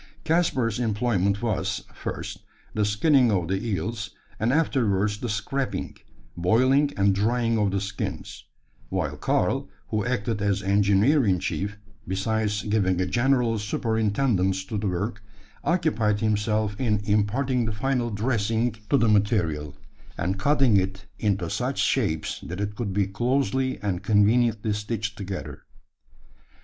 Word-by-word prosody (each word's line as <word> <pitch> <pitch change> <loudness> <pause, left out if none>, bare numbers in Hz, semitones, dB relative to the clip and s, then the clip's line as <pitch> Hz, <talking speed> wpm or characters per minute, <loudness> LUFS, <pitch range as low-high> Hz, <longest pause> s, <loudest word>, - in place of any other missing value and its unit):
Caspar's 135 - +1
employment 105 -3 0
was 110 -4 -1
first, - - -6 0.3
the 105 -1 +1
skinning 120 +4 +3
of 90 -4 0
the 95 +2 -1
eels; 110 0 -3 0.3
and 115 +3 +1
afterwards 105 -9 +1
the 120 - -3
scraping, 105 0 -2 0.4
boiling, 130 +11 +3
and 100 0 +4
drying 115 +3 +1
of 105 -2 +2
the 100 +1 0
skins; 100 +1 -5 0.4
while - - -2
Karl, - - 0 0.2
who 110 -1 0
acted 115 -3 -1
as 100 -1 0
engineer 100 +8 +3
in 95 -4 +3
chief, 100 +3 -3 0.3
besides 105 +2 -1
giving 100 -4 +1
a 95 - +1
general 120 +1 +2
superintendence 105 -2 0
to 105 +1 -3
the 105 - -1
work, 100 +4 -2 0.4
occupied 145 - +1
himself 105 -1 0
in 110 -5 +2
imparting 120 +5 +1
the 110 - -1
final 120 +3 -1
dressing 115 +1 0 0.2
to 140 - +4
the 115 - +3
material, 90 - +1 0.4
and 95 +3 -1
cutting 135 -3 +4
it 95 +1 -2
into 100 -5 0
such - - -2
shapes, - - 0
that 90 +3 -6
it 105 0 -2
could 105 -2 -3
be 100 +1 +1
closely 130 +5 0
and 95 -3 -1
conveniently 110 +1 +3
stitched 105 +1 -3
together. 95 -2 -6
105 Hz, 135 wpm, -25 LUFS, 100-120 Hz, 0.4 s, and